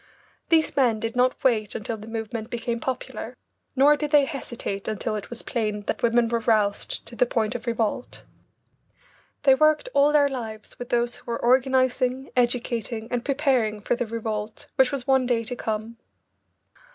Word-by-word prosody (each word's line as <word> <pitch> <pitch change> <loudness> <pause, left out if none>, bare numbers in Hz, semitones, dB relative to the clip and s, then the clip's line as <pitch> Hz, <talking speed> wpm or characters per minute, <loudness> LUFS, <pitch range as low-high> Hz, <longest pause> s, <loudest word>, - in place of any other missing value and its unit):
These 320 -2 +3
men 240 -5 +3
did 225 +2 -3
not 250 +1 +1
wait 220 -5 +2
until 225 +1 -3
the 215 0 -11
movement 225 0 -5
became 235 0 -3
popular, 260 +2 -5 0.4
nor 285 +3 +6
did 295 0 -3
they 290 -1 +5
hesitate 240 -7 -5
until 215 +1 -2
it 205 -1 -6
was 240 - -5
plain 210 -3 -2
that - - -3
women 235 0 +3
were 235 0 0
roused 215 -3 0
to 235 - -10
the 250 - +3
point 225 -1 0
of 245 0 -6
revolt. 230 +1 -2 1.2
They 270 -2 +7
worked 310 - +3
all 285 +1 +5
their 295 -1 +5
lives 225 -4 -7
with 245 - -6
those 240 0 0
who - - -19
were 235 0 -2
organising, 255 +1 +2
educating, 240 -2 -1
and 245 -1 -1
preparing 260 -7 +1
for 205 - 0
the 240 -1 -3
revolt 215 -1 -4
which 265 -2 +4
was 275 -3 -3
one 265 -2 +3
day 235 -2 +1
to 245 +2 -3
come. 220 0 -4
240 Hz, 175 wpm, -25 LUFS, 220-260 Hz, 1.2 s, They